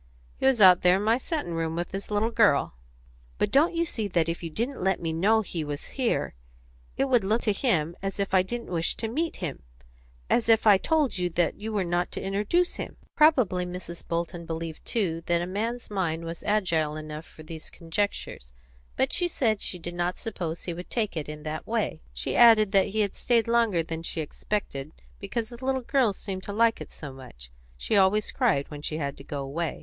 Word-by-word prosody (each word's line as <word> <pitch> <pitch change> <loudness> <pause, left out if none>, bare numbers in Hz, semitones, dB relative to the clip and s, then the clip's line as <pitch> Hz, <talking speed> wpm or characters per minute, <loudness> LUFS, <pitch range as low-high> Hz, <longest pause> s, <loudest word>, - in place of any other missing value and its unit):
"He 265 - +2
was 265 -3 +3
out 185 -3 +8
there 180 +1 +5
in 200 - -2
my 225 +3 +3
settin' 295 - -3
room 165 -1 -2
with 175 +1 -3
his 195 +1 -5
little 210 +2 +1
girl." 205 - +3 0.6
"But - - 0
don't 310 +5 +4
you 335 0 +2
see 220 -9 -3
that 170 -4 +1
if 165 0 -3
you 165 - -4
didn't 235 - -3
let 190 -1 +2
me 165 -1 -2
know 210 +7 +3
he 175 -6 -4
was 145 0 -5
here 255 -4 -1 0.6
it 270 - +2
would 245 -5 +3
look 215 +5 +1
to 210 - +2
him 175 - 0
as 195 0 -4
if 195 -1 -1
I 185 - +6
didn't 235 +3 -5
wish 165 -2 +1
to 225 - -3
meet 315 +9 -2
him 165 -7 -5 0.7
as 230 -1 +2
if 225 -1 +5
I 215 - +8
had 195 - +4
told 300 - +2
you 180 0 0
that 175 0 0
you 220 +2 -4
were 205 -3 0
not 175 0 -1
to - - -3
introduce 210 - 0
him?" - - -6 0.2
Probably 255 - +4
Mrs. 180 -1 -6
Bolton 170 0 -2
believed 165 -1 -5
too 180 -8 0
that 170 0 +3
a 175 - -2
man's 225 +6 -3
mind 170 -4 -1
was 165 0 -6
agile 170 -8 +1
enough 155 +1 -7
for 155 - -13
these 160 0 -8
conjectures; 165 - -3 0.4
but 265 +1 +1
she 355 - +2
said 225 -10 0
she 180 - -3
did 175 0 -7
not 175 +1 -1
suppose 175 -8 -4
he 175 - -3
would 175 +2 -8
take 215 -6 -1
it 155 -2 -4
in 150 0 -7
that 155 0 -5
way; 215 -8 -1
she 60 0 -3
added 225 -4 +7
that 195 -2 +4
he 210 +1 +1
stayed 230 -2 +1
longer 230 -7 +3
than 165 0 -5
she 165 - -3
expected, 155 -2 -4 0.3
because 230 - -3
the 240 +1 -11
little 265 0 0
girl 255 -3 +3
seemed 190 -1 -6
to 200 - -6
like 225 +1 +3
it - - -8
so 145 -3 -7
much; 60 - -12 0.3
she 135 - -1
always 200 +2 +3
cried 215 - +1
when 145 -1 -7
she 155 +1 -3
had 140 -3 -3
to - - -12
go 140 0 -4
away. 155 +5 -3
190 Hz, 220 wpm, -27 LUFS, 165-225 Hz, 0.7 s, out